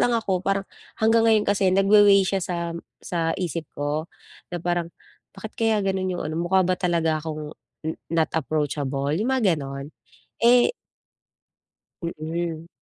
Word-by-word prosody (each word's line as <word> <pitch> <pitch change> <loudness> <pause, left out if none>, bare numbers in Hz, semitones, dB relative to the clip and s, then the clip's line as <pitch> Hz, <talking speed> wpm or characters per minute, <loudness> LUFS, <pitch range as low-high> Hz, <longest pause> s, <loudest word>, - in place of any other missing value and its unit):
lang 240 -1 +3
ako 190 -5 0
parang 195 0 0 0.3
hanggang 225 +1 +4
ngayon 215 -1 +4
kasi 200 -2 +2
nagwa-way 200 +1 +6
siya 195 0 0
sa 170 -1 -3 0.3
sa 165 -2 -1
isip 170 -4 -3
ko, 150 +3 -2 0.4
na 175 - -4
parang 175 0 -1 0.5
bakit 220 - -8
kaya 220 -3 +1
ganun 190 -1 0
yung - - -4
ano - - -3
mukha 185 +2 +3
ba 185 0 0
talaga 165 -3 +1
akong 155 -1 -6 0.3
n 160 - -1 0.2
not 160 -1 +1
approachable, 145 -2 -1
yung 210 +10 0
mga 205 -8 +3
ganon, 140 -1 -5 0.5
eh 245 - +6 1.3
Mm. 165 0 -4
175 Hz, 145 wpm, -24 LUFS, 160-195 Hz, 1.3 s, nagwa-way